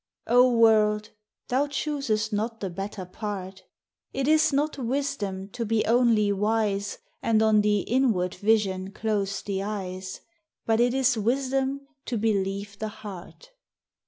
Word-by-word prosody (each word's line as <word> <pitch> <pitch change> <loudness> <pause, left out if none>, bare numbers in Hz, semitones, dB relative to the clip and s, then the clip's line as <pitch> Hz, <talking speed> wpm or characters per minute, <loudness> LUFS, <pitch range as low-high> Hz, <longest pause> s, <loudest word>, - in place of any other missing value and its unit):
O 250 +1 +5
world, 215 -1 +4 0.4
thou 270 +4 +1
choosest 275 -7 -1
not 225 +2 -2
the 195 -3 -4
better 195 +1 -5
part! 190 -1 -6 0.5
It 270 0 -1
is 310 0 +4
not 290 +1 0
wisdom 235 -7 -2
to 235 +4 -4
be 225 0 +1
only 230 -3 +3
wise, 205 0 0 0.2
And 220 -1 +3
on 215 -1 +5
the 210 -1 +2
inward 220 -8 +1
vision 195 -2 +1
close 200 -2 -1
the 195 -1 -2
eyes, 185 -2 -5 0.4
But 225 0 +2
it 245 +1 +3
is 260 -3 +2
wisdom 265 +4 0 0.2
to 240 - -2
believe 200 -1 -1
the 220 - -2
heart. 210 - -10
215 Hz, 135 wpm, -26 LUFS, 200-245 Hz, 0.5 s, O